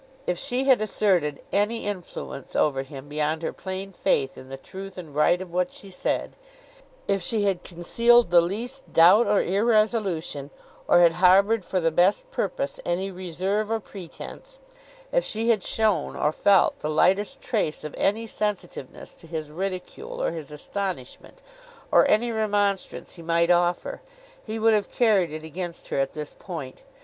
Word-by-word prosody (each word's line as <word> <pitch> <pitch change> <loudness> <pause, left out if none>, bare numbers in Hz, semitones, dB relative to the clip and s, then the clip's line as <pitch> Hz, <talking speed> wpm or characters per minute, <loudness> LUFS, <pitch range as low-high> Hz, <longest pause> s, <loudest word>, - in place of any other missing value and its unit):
If 175 -1 -1
she 260 -1 -1
had 265 -5 +4
asserted 185 -9 +1
any 210 +3 +1
influence 180 -8 -6
over 135 -3 +2
him 135 +1 -10
beyond 155 +2 -1
her - - -2
plain 190 +1 -6
faith 135 -5 0
in 130 - -12
the 135 - -6
truth 190 +7 -10
and 165 -5 -9
right 160 +4 +3
of 185 -2 -8
what 180 0 0
she 195 - -12
said; 180 - -2 0.7
if 195 -1 +1
she 210 +4 +1
had 190 -3 0
concealed 230 +5 +3
the 175 -1 +7
least 235 +10 -5
doubt 180 +8 +7
or 205 - +3
irresolution, 200 - 0 0.4
or 175 - +6
had 170 -1 +6
harboured 195 +4 +5
for 185 - -1
the 165 -1 +1
best 195 - +2
purpose 280 - -2
any 185 +3 -1
reserve 185 +4 -2
or 225 0 0
pretence; 215 - -11 0.5
if - - +2
she 225 +2 -2
had 220 -4 +3
shown, 220 -2 +1
or 150 - +1
felt, 195 +3 +3
the 150 - -3
lightest 195 - +2
trace 205 -13 -2
of 150 - -6
any 220 +3 +1
sensitiveness 205 - -5
to 165 - -16
his 155 -2 -5
ridicule 185 +2 -5
or - - 0
his 160 -4 -7
astonishment, 185 - -6 0.5
or - - +5
any 235 +3 +3
remonstrance 205 -4 -1
he - - -9
might 170 +1 +2
offer; 175 0 +1 0.4
he 220 0 -5
would 225 0 +4
have 210 -1 +1
carried 210 -8 +3
it 155 +1 -7
against 170 +2 -7
her - - -1
at 135 0 0
this 150 -1 -6
point. 155 -9 -7
185 Hz, 165 wpm, -25 LUFS, 165-215 Hz, 0.7 s, the